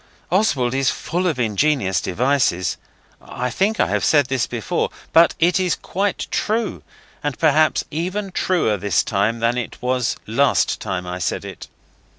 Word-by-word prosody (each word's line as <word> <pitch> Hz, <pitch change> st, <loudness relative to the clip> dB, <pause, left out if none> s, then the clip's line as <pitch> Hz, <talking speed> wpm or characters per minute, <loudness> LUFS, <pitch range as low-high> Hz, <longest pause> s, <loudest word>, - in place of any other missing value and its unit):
Oswald 140 Hz, -, +2 dB
is 135 Hz, -1 st, +2 dB
full 180 Hz, +2 st, -2 dB
of 160 Hz, -6 st, 0 dB
ingenious 115 Hz, -3 st, +1 dB
devices. 120 Hz, -4 st, 0 dB, 0.4 s
I 125 Hz, 0 st, -4 dB
think 205 Hz, -, 0 dB
I -, -, +4 dB
have -, -, 0 dB
said 145 Hz, -3 st, +4 dB
this 130 Hz, -1 st, -1 dB
before, 115 Hz, -4 st, -2 dB, 0.2 s
but 165 Hz, 0 st, +6 dB
it 175 Hz, +3 st, +3 dB
is 180 Hz, -2 st, +1 dB
quite 200 Hz, +2 st, -2 dB
true; 220 Hz, 0 st, -1 dB, 0.4 s
and 145 Hz, -2 st, -2 dB
perhaps 155 Hz, 0 st, +3 dB
even 185 Hz, +6 st, -3 dB
truer 175 Hz, -, +1 dB
this 100 Hz, -3 st, +1 dB
time 110 Hz, +3 st, 0 dB
than 120 Hz, +2 st, +1 dB
it 125 Hz, -, -6 dB
was 125 Hz, -1 st, 0 dB
last 135 Hz, +6 st, +2 dB
time 90 Hz, -1 st, -3 dB
I 90 Hz, 0 st, -5 dB
said 85 Hz, -, -2 dB
it. -, -, -9 dB
135 Hz, 160 wpm, -21 LUFS, 115-175 Hz, 0.4 s, but